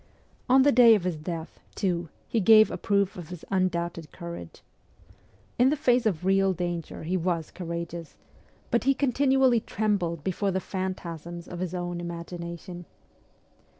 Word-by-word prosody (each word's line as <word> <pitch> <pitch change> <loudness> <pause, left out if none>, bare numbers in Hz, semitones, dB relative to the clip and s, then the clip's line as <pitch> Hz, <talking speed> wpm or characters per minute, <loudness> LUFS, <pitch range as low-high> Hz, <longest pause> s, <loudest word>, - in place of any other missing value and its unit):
On 260 +1 +6
the 285 - +5
day 235 -2 +7
of 200 - -1
his 180 -2 -1
death, 165 +1 -6 0.2
too, 175 -4 -1 0.2
he 230 - 0
gave 215 +1 +7
a - - -3
proof 200 -2 +1
of 175 -4 -8
his 180 -2 -9
undoubted 170 -4 -1
courage. 170 - -9 1.0
In 250 +2 +6
the 295 - +2
face 250 -5 +3
of 180 -4 -1
real 195 0 +3
danger 175 -3 -4
he 175 +4 -1
was 170 -3 -1
courageous; 170 -2 -6 0.5
but 235 - +1
he 275 0 +4
continually 265 -2 +3
trembled 195 -8 -1
before 195 +3 -1
the 190 0 0
phantasms 175 -3 -5
of 175 - -7
his 185 0 -3
own 175 -1 -3
imagination. 170 0 -7
180 Hz, 150 wpm, -27 LUFS, 170-215 Hz, 1.0 s, day